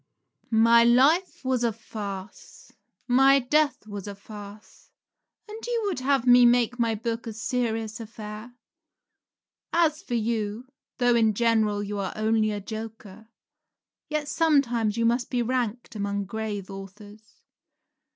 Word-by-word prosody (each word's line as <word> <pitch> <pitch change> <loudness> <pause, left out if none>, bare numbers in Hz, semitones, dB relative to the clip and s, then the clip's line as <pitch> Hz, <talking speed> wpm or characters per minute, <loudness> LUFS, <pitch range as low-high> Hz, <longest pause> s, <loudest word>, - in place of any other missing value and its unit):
Rabelais. 225 - 0
My 230 +1 +6
life 275 +8 +3
was 255 -2 0
a 235 - +2
farce; 205 - -9 0.4
my 270 +2 +5
death 280 0 +1
was 205 -2 -7
a 200 - -6
farce; 205 0 -12 0.6
and 425 +1 -8 0.2
would 390 -9 -2
you 255 - -8
have 275 -3 +2
me 245 0 +7
make 245 0 +3
my 230 -1 +1
book 230 +2 -4
a 225 - -5
serious 225 -1 -2
affair? 220 +1 -9 1.2
As 325 -2 +2
for 245 - -4
you, 220 0 -2 0.3
though 245 -1 +3
in 220 -3 +3
general 220 -2 +1
you 205 0 -4
are 195 - -3
only 220 0 +1
a 205 -1 -3
joker, 220 0 -9 0.8
yet 305 -1 -2
sometimes 245 -10 +1
you 230 - +1
must 240 +2 +1
be 245 -2 0
ranked 240 -1 -2
among 200 -1 -2
grave 205 -1 -5
authors. 205 +2 -12
225 Hz, 140 wpm, -26 LUFS, 210-245 Hz, 1.2 s, me